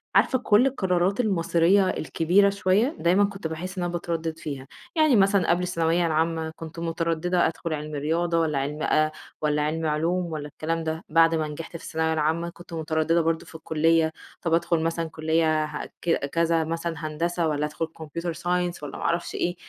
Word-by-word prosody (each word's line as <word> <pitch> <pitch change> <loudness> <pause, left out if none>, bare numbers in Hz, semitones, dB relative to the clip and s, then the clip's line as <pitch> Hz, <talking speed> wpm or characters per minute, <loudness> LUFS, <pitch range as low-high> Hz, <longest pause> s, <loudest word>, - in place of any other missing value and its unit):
عارفة 260 - +4
كل 225 +1 +4
القرارات 190 -4 0
المصيرية 185 -2 +3
الكبيرة 180 +6 +2
شويّة، 200 - +1
دايمًا 185 +4 +4
كنت 200 -4 -2
باحس 180 +4 -6
إن 180 - -1
أنا 175 0 -2
باتردد 165 -1 -3
فيها، 135 -3 -6 0.3
يعني 310 -5 +4
مثلًا 195 -2 +3
قبل 175 +1 +3
الثانوية 170 -1 +1
العامة 160 0 0
كنت 165 0 -8
مترددة 165 +1 0
أدخل 165 0 -4
علمي 150 0 -4
رياضة 165 +3 +1
والّا 155 -3 +1
علمي 145 +3 -2
آآ، 155 0 +2 0.3
والّا 150 -1 +1
علمي 155 +2 -1
علوم، 170 +4 0
والّا 150 -1 -4
الكلام 165 +2 -3
ده، 160 +1 -3
بعد 165 +1 +5
ما 155 -1 0
نجحت 165 +3 -7
في - - -15
الثانوية 160 0 -1
العامة، 160 +2 0
كنت 175 0 -13
مترددة 160 +1 +1
برضو 165 0 0
في - - -14
الكلية، 160 0 +2 0.3
طَب 170 - -1
أدخل 170 0 +2
مثلًا 165 0 -1
كلية 155 0 +1
ها 150 0 -5 0.2
ك 165 -4 +1
كذا 165 +2 +1
مثلًا 165 +1 -3
هندسة، 170 +2 -1
والّا 150 -1 0
أدخل 150 +2 -3 0.2
Computer 170 +3 -4
science 175 -2 -1
والّا 145 - -6
ما - - -6
اعرفش 170 +1 -1
إيه، 175 +1 -1
165 Hz, 185 wpm, -25 LUFS, 160-175 Hz, 0.3 s, بعد